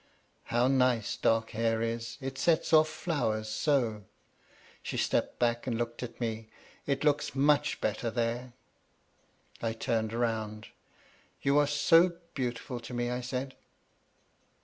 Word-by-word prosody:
"How 120 +2 +2
nice 125 -4 +2
dark 115 0 +1
hair 115 0 0
is; 115 0 -3
it 135 0 -5
sets 165 +1 +2
off 155 0 +6
flowers 135 -10 -1
so." 110 -4 0 0.8
She - - -4
stepped - - 0
back 120 +1 0
and 115 -3 0
looked 120 0 -3
at 125 - -7
me. 110 -2 -3 0.4
"It 140 0 0
looks 145 -2 +1
much 145 +1 +3
better 110 +2 -1
there!" 120 +1 -2 1.1
I 115 -1 -1
turned 110 -1 -1
round. 110 -2 -2 0.7
"You 140 +1 +4
are 145 - +3
so 165 +4 +4 0.2
beautiful 125 -2 -3
to 120 +1 -8
me," 120 0 -1
I 125 0 -2
said. 130 +2 -4
120 Hz, 135 wpm, -30 LUFS, 115-135 Hz, 1.1 s, off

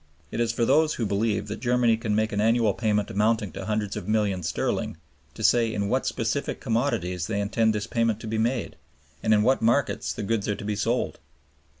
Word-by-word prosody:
It - - -4
is 115 -1 +2
for 115 0 0
those 150 +5 +3
who 115 - -1
believe 105 +2 0
that 105 - -5
Germany 120 -1 +3
can 110 -2 -2
make 110 0 +1
an 105 - 0
annual 115 -1 +3
payment 105 -2 0
amounting 105 -1 +1
to 95 - -7
hundreds 105 -1 -2
of 105 -3 -6
millions 100 -6 0
sterling 80 - -2 0.4
to 110 - -7
say 115 +1 +4
in 100 -2 -2
what 130 +3 0
specific 125 +4 -2
commodities 90 -8 -1
they 105 -2 -1
intend 110 +2 +1
this 105 0 -2
payment 115 -1 0
to - - -7
be 110 0 -1
made 120 +1 -1 0.4
and - - +1
in 105 -1 +5
what 130 +4 +3
markets 120 +4 +1
the - - -5
goods 110 0 -1
are 105 - 0
to 105 - -8
be 105 0 -1
sold. 115 +4 -1
110 Hz, 215 wpm, -26 LUFS, 105-115 Hz, 0.4 s, in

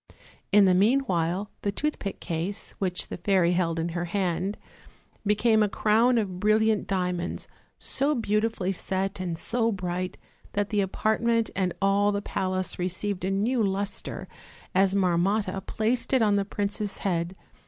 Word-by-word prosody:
In 205 0 +7
the 185 - +5
meanwhile 195 -4 +2
the 200 - 0
toothpick 210 -4 -3
case, 170 +4 -4
which 180 -2 -1
the - - -5
fairy 180 -1 +3
held 170 -2 +1
in 165 +1 -1
her 175 +1 -2
hand, 185 +2 -1 0.7
became 220 +1 +4
a 210 - +3
crown 225 +4 +3
of 190 -5 -1
brillant 215 +1 +2
diamonds, 180 -2 -2 0.3
so 285 +2 +1
beautifully 215 -4 0
set 195 +1 -2
and 175 -3 -3
so 230 +5 0
bright 180 -2 -3 0.4
that 205 0 0
the 210 -2 +2
apartment 225 +4 +1
and 185 -3 0
all 200 +1 +3
the 200 - 0
palace 185 -2 -2
received 185 +1 -2
a 190 - 0
new 220 +6 +1
luster, 200 0 -2 0.5
as 195 +1 +3
Marmotta 195 +2 +1
placed 235 +4 -1
it 260 -3 +5
on 205 -2 +3
the 200 -1 +1
princess' 205 0 -2
head. 175 -1 0
195 Hz, 150 wpm, -27 LUFS, 180-215 Hz, 0.7 s, In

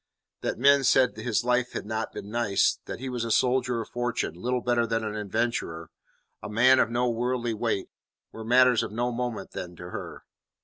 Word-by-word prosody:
That - - -2
men 140 +3 +5
said 130 0 +4
his 110 +1 -1
life 125 0 +1
had - - -4
not 110 +1 -3
been 100 - -8
nice, 115 -4 +2
that - - -6
he 135 - -5
was 125 -2 -3
a 115 - -3
soldier 125 0 +2
of 110 - -8
fortune, 120 -7 -2
little 125 +8 -2
better 120 -1 +1
than 115 0 -1
an 105 -1 -3
adventurer, 105 -6 -2 0.5
a 105 - -7
man 125 +5 +5
of - - +3
no 120 +1 0
worldly 120 0 -1
weight, 110 -3 -2 0.4
were 110 - -8
matters 125 +1 +5
of - - -4
no 120 +3 -1
moment 120 -1 -4
then 90 -1 -7
to 90 +1 -9
her. - - -7
120 Hz, 200 wpm, -27 LUFS, 110-125 Hz, 0.5 s, men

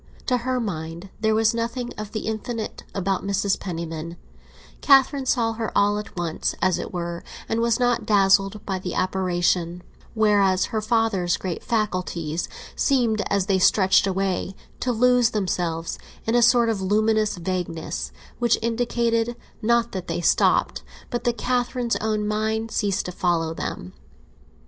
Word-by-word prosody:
To 250 - +2
her 255 +1 -1
mind 170 -3 -5
there 220 0 +2
was 220 +1 +3
nothing 235 +1 -3
of 215 -1 -6
the 220 - -3
infinite 220 +1 -4
about 195 -1 -1
Mrs. 200 0 0
Penniman; 170 -2 -5 0.6
Catherine 275 -1 +4
saw 230 -3 +2
her 225 -1 -3
all 205 +1 +3
at 210 - -9
once, 170 -2 -2
as 185 0 +2
it - - -5
were, 170 -1 -4 0.2
and 225 +1 0
was 235 0 +2
not 245 -1 +2
dazzled 195 0 +3
by 190 -2 -2
the 180 -1 -5
apparition; 180 -2 0 0.3
whereas 200 -4 +3
her 220 - 0
father's 215 -6 +1
great 180 -3 -4
faculties 180 -7 -2 0.3
seemed, 235 -6 +2
as 200 -2 +1
they 195 -2 +2
stretched 190 +1 +4
away, 190 0 -1 0.2
to 250 - 0
lose 245 0 +4
themselves 175 -6 -2 0.3
in 225 - 0
a 240 - +4
sort 235 0 +5
of 215 -4 -1
luminous 215 +2 +2
vagueness, 175 -2 -3 0.3
which 240 -1 +3
indicated, 235 0 0 0.3
not 235 +1 +2
that 185 -2 -5
they - - -2
stopped, 175 - +2 0.3
but 240 +1 -3
that 240 -1 +1
Catherine's 245 -1 0
own 215 -1 -1
mind 220 +1 -1
ceased 200 -2 0
to 180 - -4
follow 170 -2 0
them. 90 - -5
210 Hz, 150 wpm, -24 LUFS, 185-230 Hz, 0.6 s, sort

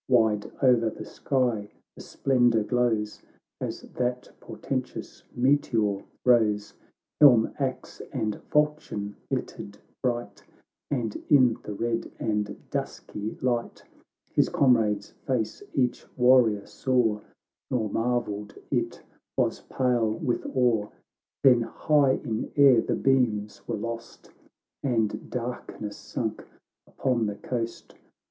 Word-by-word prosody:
"Wide 110 -4 +3
o'er 120 -3 +5
the - - -8
sky 120 -6 -1 0.3
the - - -11
splendour 120 -4 +2
glows, 110 -3 0 0.4
As - - -4
that 125 0 -3
portentous - - -5
meteor 120 -6 +2 0.2
rose; 110 -4 +3 0.5
Helm, 125 -7 +7
axe, 130 -2 -3
and 110 -6 -2
falchion 150 -9 0
glittered 100 0 -4 0.2
bright, 120 -2 -2 0.5
And 120 -6 -2
in 130 -6 +6
the 105 - -6
red 115 +2 -2
and 105 -2 -2
dusky 105 +1 -4
light 120 -2 -1 0.5
His - - +3
comrade's 110 -6 +2 0.2
face 115 -5 -1
each 125 -2 0
warrior 125 -5 +5
saw, 120 -5 +1 0.5
Nor 120 -4 0
marvelled 110 -3 -1 0.2
it - - -1 0.3
was - - +1
pale 120 -4 +1
with 120 +2 -2
awe. 120 -5 +3 0.6
Then 125 -3 +7
high 140 +3 +2
in 110 -6 -3
air 135 -5 +7
the - - -1
beams 115 -6 +1
were - - -2
lost, 115 +2 -7 0.5
And 110 -5 -1
darkness 115 -4 -5
sunk 110 -3 -4 0.4
upon 120 -5 0
the 105 - -3
coast. 115 +2 -5
120 Hz, 110 wpm, -27 LUFS, 105-125 Hz, 0.6 s, Helm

